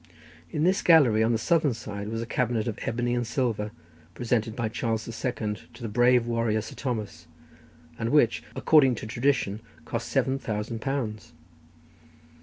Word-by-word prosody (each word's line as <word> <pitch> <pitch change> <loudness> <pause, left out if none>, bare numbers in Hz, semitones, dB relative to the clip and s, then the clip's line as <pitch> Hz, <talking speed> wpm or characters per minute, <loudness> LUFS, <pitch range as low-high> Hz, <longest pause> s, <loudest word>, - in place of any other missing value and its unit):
In 150 - -1
this 185 +3 +3
gallery, 135 -11 +5
on 110 +1 +3
the 115 - +2
southern 150 +1 +2
side, 100 -2 -6
was 115 +1 -3
a - - -5
cabinet 115 -2 -1
of 115 - -3
ebony 120 +1 0
and 120 -1 -1
silver, 115 -4 -1 0.5
presented 115 -2 -1
by 115 - -1
Charles 110 0 -2
the - - -6
Second 110 -3 -3
to - - -11
the - - -2
brave 120 +2 +4
warrior 115 -2 0
Sir - - -9
Thomas, 115 -6 -4 0.7
and 115 - -1
which, 140 -5 +3
according 135 -6 +5
to 110 - -7
tradition, 120 -3 0 0.3
cost - - -3
seven 135 +1 +1
thousand 110 0 -4
pounds. 115 -6 -3
115 Hz, 165 wpm, -27 LUFS, 110-125 Hz, 0.7 s, gallery